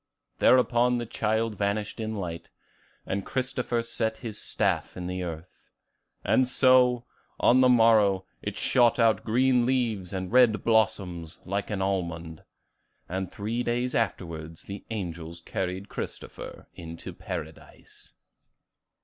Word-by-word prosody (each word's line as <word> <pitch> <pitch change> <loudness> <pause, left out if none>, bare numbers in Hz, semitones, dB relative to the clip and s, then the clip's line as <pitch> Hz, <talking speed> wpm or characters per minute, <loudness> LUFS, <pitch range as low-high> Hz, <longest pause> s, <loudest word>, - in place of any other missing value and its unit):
Thereupon 125 -1 +4
the 120 - -3
child 110 0 -1
vanished 100 +1 -1
in 110 0 -3
light; 85 -4 -5 0.6
and 100 0 -2
Christopher 125 -1 -2
set 110 -1 -1
his 110 -4 -6
staff - - -1
in 90 - -5
the 90 +1 -3
earth. 85 0 -6 0.7
And 130 - +3
so, 125 -1 +4 0.3
on 130 +2 +5
the 130 - +6
morrow, 110 -5 +5 0.2
it - - -4
shot 120 -2 +3
out 115 -2 +3
green 125 +2 +3
leaves 120 -8 0
and 95 -2 -4
red 120 -5 +5
blossoms, 100 -7 0
like 100 +2 -2
an 100 -3 -1
almond. 85 -4 -3 0.6
And 95 0 -3
three 110 +4 -3
days 125 +1 -1
afterwards 85 -7 -3
the 100 +1 -8
angels 85 -6 -5
carried 95 +3 -4
Christopher - - -7
to 85 -1 -8
Paradise." - - -9
105 Hz, 125 wpm, -27 LUFS, 90-120 Hz, 0.7 s, the